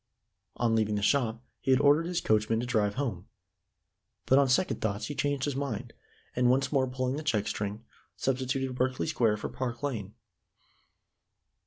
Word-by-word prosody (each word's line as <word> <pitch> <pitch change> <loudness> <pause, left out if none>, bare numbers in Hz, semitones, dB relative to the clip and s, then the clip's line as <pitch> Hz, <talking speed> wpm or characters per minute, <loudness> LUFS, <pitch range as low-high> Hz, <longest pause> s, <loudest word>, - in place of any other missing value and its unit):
On 115 -2 +1
leaving 110 -1 +1
the 105 - -2
shop, 115 -2 +1 0.2
he - - -5
had 130 -1 +5
ordered 145 +3 +4
his 175 -1 -1
coachman 110 +1 +2
to 120 - -2
drive 105 -4 +1
home; 110 -10 -3 1.0
but 130 - +5
on 140 -2 +3
second 180 +9 +1
thoughts 105 -1 -1
he 145 - -4
changed 145 -2 0
his 145 -3 -2
mind, 125 -4 -4 0.4
and, 125 0 +3
once 135 +2 +2
more 135 -3 +2
pulling 130 +1 -2
the 155 - -4
check 110 -9 0
string, 105 +2 -4 0.3
substituted 130 0 -1
Berkeley 130 0 0
Square 115 -9 +1
for - - -5
Park 125 0 -4
Lane. 110 -8 -3
125 Hz, 170 wpm, -29 LUFS, 110-135 Hz, 1.0 s, had